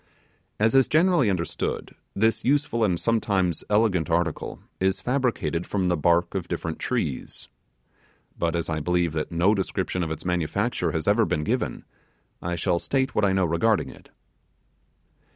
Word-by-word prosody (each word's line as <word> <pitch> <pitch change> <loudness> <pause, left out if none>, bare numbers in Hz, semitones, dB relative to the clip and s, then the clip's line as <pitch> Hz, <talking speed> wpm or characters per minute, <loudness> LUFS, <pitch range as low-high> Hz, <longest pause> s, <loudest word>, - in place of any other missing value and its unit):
As 110 +1 +3
is 135 -1 +5
generally 165 - +3
understood, 85 -2 -3 0.2
this 110 +2 +2
useful 135 -4 +1
and 90 -5 +1
sometimes 100 -7 0
elegant 105 -6 +2
article 85 -1 -1 0.2
is 95 +1 +1
fabricated 105 - -1
from 95 -3 0
the 90 - +2
bark 85 +2 +2
of 90 -3 -3
different 85 -2 -4
trees. 80 - -3 0.9
But, 85 -1 -1
as 85 - -1
I 80 -2 -1
believe 90 +1 0
that 75 -1 -3
no 85 +5 +3
description 95 -2 -2
of 85 - -2
its 80 - -6
manufacture 90 +2 0
has 80 0 -3
ever 105 +3 +4
been 75 - -1
given, - - -2 0.6
I 85 0 -2
shall 85 +1 0
state 135 +5 0
what 105 - +1
I 95 - +3
know 95 -1 +2
regarding 95 +7 +1
it. - - -17
90 Hz, 155 wpm, -25 LUFS, 85-110 Hz, 0.9 s, is